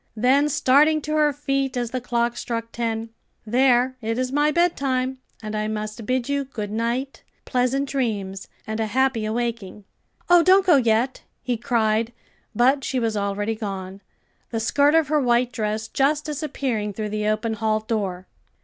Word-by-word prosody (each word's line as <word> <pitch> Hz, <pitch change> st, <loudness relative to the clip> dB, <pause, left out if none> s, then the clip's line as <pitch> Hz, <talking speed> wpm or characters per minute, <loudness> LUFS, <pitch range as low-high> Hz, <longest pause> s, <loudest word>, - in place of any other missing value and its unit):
Then 270 Hz, +6 st, +3 dB
starting 300 Hz, +2 st, +4 dB
to 305 Hz, +1 st, -4 dB
her 300 Hz, -1 st, +3 dB
feet 275 Hz, -2 st, -2 dB
as 240 Hz, -2 st, -2 dB
the 255 Hz, -, -3 dB
clock 235 Hz, 0 st, 0 dB
struck 230 Hz, -1 st, -4 dB
ten 225 Hz, -1 st, -3 dB, 0.4 s
"There, 250 Hz, +2 st, +3 dB
it 225 Hz, +1 st, -2 dB
is 255 Hz, 0 st, -1 dB
my 295 Hz, +2 st, +2 dB
bed 345 Hz, +3 st, +2 dB
time, 260 Hz, -1 st, -1 dB, 0.2 s
and 215 Hz, 0 st, -4 dB
I 215 Hz, 0 st, -1 dB
must 215 Hz, 0 st, -5 dB
bid 255 Hz, -1 st, 0 dB
you 280 Hz, 0 st, 0 dB
good 215 Hz, -6 st, -6 dB
night, 235 Hz, +5 st, -2 dB, 0.2 s
pleasant 260 Hz, +2 st, 0 dB
dreams, 205 Hz, -8 st, -3 dB, 0.2 s
and 220 Hz, +1 st, -4 dB
a 220 Hz, -, 0 dB
happy 260 Hz, 0 st, +1 dB
awaking." 220 Hz, -3 st, -3 dB, 0.4 s
"Oh, 350 Hz, -1 st, +7 dB
don't 375 Hz, +2 st, +5 dB
go 345 Hz, -6 st, +6 dB
yet!" 235 Hz, +1 st, +1 dB, 0.2 s
he 245 Hz, -, -1 dB
cried, 225 Hz, -1 st, 0 dB, 0.4 s
but 265 Hz, +4 st, +3 dB
she 260 Hz, -, -1 dB
was 225 Hz, -2 st, -1 dB
already 205 Hz, +1 st, -1 dB
gone, 195 Hz, -3 st, -6 dB, 0.5 s
the 225 Hz, -, -2 dB
skirt 285 Hz, +7 st, +3 dB
of 320 Hz, -4 st, +3 dB
her 305 Hz, -1 st, +3 dB
white 245 Hz, -1 st, +2 dB
dress 215 Hz, -1 st, -2 dB
just 290 Hz, +5 st, +1 dB
disappearing 265 Hz, -8 st, -3 dB
through 215 Hz, +1 st, -4 dB
the 210 Hz, 0 st, -2 dB
open 215 Hz, +1 st, 0 dB
hall 215 Hz, 0 st, 0 dB
door. 200 Hz, -5 st, -3 dB
240 Hz, 170 wpm, -23 LUFS, 215-270 Hz, 0.5 s, Oh